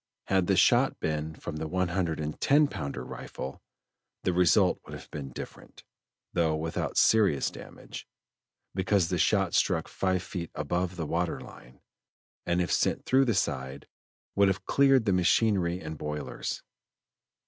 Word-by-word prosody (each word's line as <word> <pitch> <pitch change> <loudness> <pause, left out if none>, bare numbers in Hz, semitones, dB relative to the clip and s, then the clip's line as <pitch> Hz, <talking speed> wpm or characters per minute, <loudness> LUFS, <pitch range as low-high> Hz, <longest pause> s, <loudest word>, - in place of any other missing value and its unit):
Had 95 -2 +2
the - - +3
shot - - +4
been 75 0 -2
from 80 -1 -6
the 80 0 -3
one 90 +2 0
hundred 85 -3 -1
and 75 0 -4
ten 145 +2 +5
pounder 80 - -5
rifle, 65 - -7 0.6
the 90 - +1
result 90 -2 +4
would - - -9
have - - -12
been 70 -2 -6
different, 60 - -10 0.5
though 80 -2 +2
without 80 +1 -3
serious 105 -10 +4
damage, - - -10 0.7
because 95 -2 +1
the - - -1
shot - - +2
struck - - +2
five 95 -1 -1
feet 85 -4 -5
above 90 +5 -2
the 85 -2 -3
water 85 +3 -1
line, 60 +1 -14 0.7
and 90 +1 +2
if 85 - -4
sent - - +1
through 135 +1 +4
the 115 -4 +1
side 65 -6 -2 0.5
would 100 0 +5
have 95 0 -1
cleared 135 -4 +4
the 100 - +2
machinery 90 -1 +2
and 80 -3 -7
boilers. 75 -3 -4
85 Hz, 155 wpm, -28 LUFS, 75-95 Hz, 0.7 s, ten